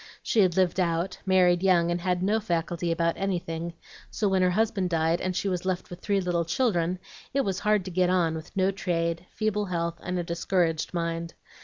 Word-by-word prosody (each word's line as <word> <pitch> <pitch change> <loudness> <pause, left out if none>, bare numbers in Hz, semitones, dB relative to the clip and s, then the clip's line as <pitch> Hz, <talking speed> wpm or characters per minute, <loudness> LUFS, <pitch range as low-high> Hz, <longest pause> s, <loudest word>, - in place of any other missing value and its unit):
She 230 - +1
had 185 -3 +4
lived 185 -1 +2
out, 170 +1 0
married 180 -2 +4
young, 175 -3 +3
and 175 0 -1
had 180 0 0
no 210 +3 +2
faculty 170 -3 -1
about 170 0 +1
anything; 170 -3 -3 0.4
so 210 - -1
when 190 -1 +2
her 180 - +4
husband 195 -1 +1
died, 165 0 +1
and 185 0 -2
she 180 +2 -1
was 180 -2 -1
left 185 -1 -2
with 175 - -7
three 200 +1 0
little 175 -2 0
children, 175 -2 0 0.4
it 275 - +4
was 195 -5 -1
hard 210 -3 +2
to 185 - -5
get 180 0 +2
on, 175 -3 +2
with 160 -1 -7
no 190 0 +3
trade, 170 -2 -2
feeble 210 -1 -1
health, 170 -2 -2
and 180 0 -3
a 175 - -1
discouraged 170 -1 0
mind. 170 0 -2
180 Hz, 205 wpm, -27 LUFS, 170-190 Hz, 0.4 s, had